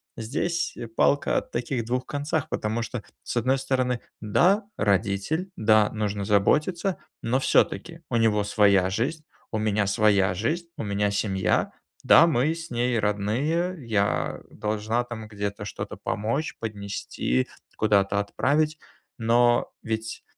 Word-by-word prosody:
здесь 165 Hz, +9 st, -2 dB, 0.2 s
палка 145 Hz, -, +3 dB
о -, -, +2 dB
таких 120 Hz, 0 st, -3 dB
двух 125 Hz, +2 st, -1 dB
концах, 145 Hz, 0 st, -2 dB
потому 110 Hz, +2 st, -1 dB
что, 115 Hz, -1 st, -5 dB, 0.2 s
с -, -, -5 dB
одной 130 Hz, +3 st, +2 dB
стороны, 130 Hz, -2 st, 0 dB, 0.2 s
да, 180 Hz, -, +3 dB
родитель, 100 Hz, -, 0 dB
да, 110 Hz, -1 st, +4 dB
нужно 105 Hz, -2 st, -2 dB
заботиться, 150 Hz, -, +2 dB, 0.3 s
но 125 Hz, +3 st, +1 dB
всё-таки, 165 Hz, +4 st, +1 dB
у 120 Hz, -, -1 dB
него 110 Hz, -2 st, +3 dB
своя 100 Hz, -3 st, +4 dB
жизнь, 135 Hz, -, -2 dB, 0.3 s
у 110 Hz, -, -1 dB
меня 105 Hz, -1 st, +1 dB
своя 100 Hz, -2 st, +3 dB
жизнь, 160 Hz, -, -1 dB
у -, -, -3 dB
меня 100 Hz, 0 st, 0 dB
семья, 100 Hz, -2 st, 0 dB, 0.3 s
да, 165 Hz, -, +7 dB
мы 150 Hz, 0 st, +2 dB
с 165 Hz, 0 st, -8 dB
ней 120 Hz, 0 st, 0 dB
родные, 120 Hz, -, 0 dB
я 105 Hz, -3 st, 0 dB
должна, 110 Hz, +3 st, -1 dB
там, 115 Hz, -3 st, -7 dB
где-то 105 Hz, -1 st, -4 dB
что-то -, -, -6 dB
помочь, 115 Hz, +9 st, -2 dB
поднести, 100 Hz, -, -2 dB, 0.3 s
куда-то 100 Hz, -2 st, +2 dB
отправить, 150 Hz, +9 st, 0 dB, 0.4 s
но 120 Hz, 0 st, +3 dB
ведь 110 Hz, -1 st, -4 dB
115 Hz, 130 wpm, -25 LUFS, 105-135 Hz, 0.4 s, да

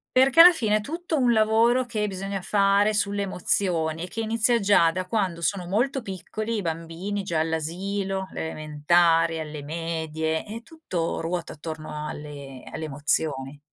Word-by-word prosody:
perché 265 Hz, +3 st, +4 dB
alla 355 Hz, +2 st, +10 dB
fine 220 Hz, -10 st, +1 dB
è 215 Hz, -, -3 dB
tutto 330 Hz, +5 st, -3 dB
un 245 Hz, -2 st, +3 dB
lavoro 225 Hz, +3 st, +3 dB
che 215 Hz, -3 st, -2 dB
bisogna 195 Hz, 0 st, -4 dB
fare 200 Hz, +2 st, +2 dB
sulle 200 Hz, 0 st, 0 dB
emozioni, 175 Hz, -4 st, +1 dB
e 180 Hz, -, -5 dB
che 225 Hz, -, -5 dB
inizia 230 Hz, +2 st, +2 dB
già 195 Hz, -5 st, +4 dB
da 185 Hz, +2 st, -3 dB
quando 185 Hz, -4 st, -1 dB
sono 180 Hz, -2 st, -1 dB
molto 255 Hz, +8 st, 0 dB
piccoli 215 Hz, +3 st, -5 dB
i 210 Hz, -, -1 dB
bambini, 165 Hz, +5 st, -4 dB
già 170 Hz, -4 st, -2 dB
all'asilo, 190 Hz, +5 st, -2 dB
le -, -, -5 dB
elementari, 165 Hz, +2 st, +2 dB
alle 150 Hz, -1 st, -6 dB
medie 160 Hz, 0 st, -3 dB
e 225 Hz, +2 st, -7 dB
tutto 235 Hz, -, -4 dB
ruota 170 Hz, 0 st, -3 dB
attorno 155 Hz, -1 st, -6 dB
alle 140 Hz, -4 st, -8 dB
alle 160 Hz, -, -5 dB
emozioni. 145 Hz, -1 st, -1 dB
185 Hz, 155 wpm, -25 LUFS, 160-215 Hz, -, alla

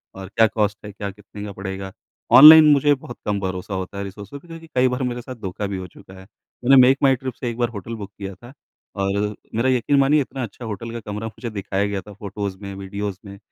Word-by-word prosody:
और 95 Hz, 0 st, -8 dB
क्या 115 Hz, 0 st, +5 dB
कॉस्ट 105 Hz, -1 st, -1 dB
है? 105 Hz, -, -7 dB
क्या 100 Hz, 0 st, -5 dB
कितने 105 Hz, +1 st, -11 dB
का 105 Hz, -, -6 dB
पड़ेगा? 95 Hz, 0 st, -6 dB, 0.4 s
ऑनलाइन 155 Hz, +3 st, +11 dB
मुझे 145 Hz, +1 st, +4 dB
बहुत 130 Hz, -3 st, -8 dB
कम 105 Hz, -1 st, 0 dB
भरोसा 95 Hz, 0 st, -4 dB
होता 95 Hz, +1 st, -5 dB
है 100 Hz, -, -3 dB
रिसोर्सेज़ 100 Hz, +7 st, -9 dB
पे -, -, -20 dB
क्योंकि 165 Hz, -1 st, -11 dB
कई 125 Hz, 0 st, +4 dB
बार 125 Hz, +1 st, -2 dB
मेरे 120 Hz, -1 st, -3 dB
साथ 130 Hz, +1 st, -8 dB
धोखा 100 Hz, +2 st, -4 dB
भी 100 Hz, -1 st, -4 dB
हो 95 Hz, -1 st, -6 dB
चुका 95 Hz, -, -16 dB
है। -, -, -12 dB, 0.4 s
मैंने 135 Hz, +2 st, +7 dB
मेकमाईट्रिप 130 Hz, 0 st, +3 dB
से 120 Hz, -, -2 dB
एक 115 Hz, -, -6 dB
बार 120 Hz, -1 st, 0 dB
होटल 115 Hz, 0 st, -7 dB
बुक 100 Hz, -2 st, -8 dB
किया 100 Hz, -1 st, -6 dB
था 120 Hz, +7 st, -14 dB, 0.4 s
और 100 Hz, +1 st, -1 dB, 0.2 s
मेरा 120 Hz, +4 st, +2 dB
यकीन 130 Hz, +2 st, +2 dB
मानिए 145 Hz, +2 st, +4 dB
इतना 135 Hz, -1 st, -5 dB
अच्छा 115 Hz, +2 st, -8 dB
होटल 110 Hz, +1 st, -6 dB
का 115 Hz, -, -5 dB
कमरा 105 Hz, +2 st, -4 dB
मुझे 115 Hz, +2 st, -7 dB
दिखाया 100 Hz, -2 st, -2 dB
गया 100 Hz, -1 st, -3 dB
था 105 Hz, +2 st, -13 dB
फ़ोटोज़ 100 Hz, -1 st, -5 dB
में, 100 Hz, -1 st, -7 dB
वीडियोज़ 100 Hz, 0 st, -5 dB
में 100 Hz, 0 st, -10 dB
105 Hz, 235 wpm, -22 LUFS, 100-125 Hz, 0.4 s, ऑनलाइन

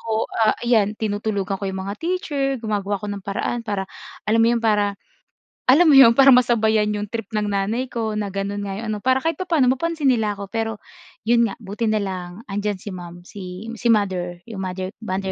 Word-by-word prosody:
ko, 225 Hz, -1 st, -1 dB, 0.2 s
ah, 215 Hz, -1 st, +4 dB
ayan 220 Hz, -4 st, +2 dB
tinutulugan 205 Hz, -2 st, -2 dB
ko -, -, -4 dB
'yong 190 Hz, 0 st, -4 dB
mga 200 Hz, +1 st, -4 dB
teacher, 325 Hz, -5 st, -1 dB, 0.2 s
gumagawa 205 Hz, -2 st, -1 dB
ako 210 Hz, -, -5 dB
ng 200 Hz, -1 st, -6 dB
paraan 210 Hz, +4 st, -2 dB
para 200 Hz, -2 st, -1 dB, 0.4 s
alam 225 Hz, +2 st, +2 dB
mo 225 Hz, -, +5 dB
'yon, 235 Hz, 0 st, +1 dB
para, 205 Hz, -2 st, +2 dB, 0.7 s
alam 315 Hz, +6 st, +7 dB
mo 295 Hz, -, +7 dB
'yon, 265 Hz, -4 st, +9 dB
para 275 Hz, 0 st, +8 dB
masabayan 220 Hz, -3 st, +3 dB
'yong 210 Hz, 0 st, -3 dB
trip 225 Hz, -1 st, -5 dB
ng 210 Hz, -1 st, -1 dB
nanay 205 Hz, +6 st, -1 dB
ko 225 Hz, -3 st, -3 dB
na 210 Hz, -1 st, -1 dB
gano'n 200 Hz, +1 st, -3 dB
nga 195 Hz, -1 st, -4 dB
'yong 225 Hz, +1 st, -5 dB
ano. 210 Hz, -, -3 dB
Para 260 Hz, +4 st, +1 dB
kahit 325 Hz, -2 st, -1 dB
papaano 325 Hz, -9 st, +2 dB
mapansin 305 Hz, 0 st, +1 dB
nila 215 Hz, -4 st, 0 dB
ako. 200 Hz, -1 st, -8 dB
Pero 225 Hz, -1 st, -1 dB, 0.5 s
'yon 235 Hz, +1 st, +3 dB
nga, -, -, -6 dB
buti 210 Hz, +3 st, -3 dB
na 215 Hz, -1 st, +1 dB
lang, 185 Hz, -2 st, -4 dB, 0.2 s
'andiyan 205 Hz, 0 st, -1 dB
si -, -, -7 dB
ma'am, 175 Hz, -2 st, -8 dB
si 185 Hz, +3 st, -8 dB
si 240 Hz, -, 0 dB
mother 185 Hz, -5 st, +1 dB
'yong 205 Hz, -4 st, -6 dB
mother, 185 Hz, 0 st, -4 dB
mother 190 Hz, -3 st, -3 dB
210 Hz, 210 wpm, -22 LUFS, 200-235 Hz, 0.7 s, yon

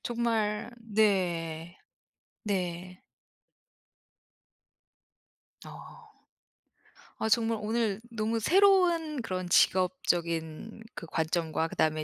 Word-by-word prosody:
정말 230 Hz, -2 st, -1 dB
네. 175 Hz, -7 st, 0 dB, 0.7 s
네. 180 Hz, -2 st, -3 dB, 2.6 s
아. 470 Hz, -2 st, -12 dB, 1.1 s
아 220 Hz, -, -1 dB
정말 225 Hz, 0 st, +2 dB
오늘 220 Hz, -1 st, -1 dB
너무 225 Hz, 0 st, -1 dB
새로운 345 Hz, -, +3 dB
그런 185 Hz, -4 st, -4 dB
직업적인 175 Hz, +1 st, +1 dB
그 -, -, -7 dB
관점과 160 Hz, 0 st, -1 dB
그다음에 155 Hz, -1 st, 0 dB
205 Hz, 145 characters per minute, -29 LUFS, 170-230 Hz, 2.6 s, 새로운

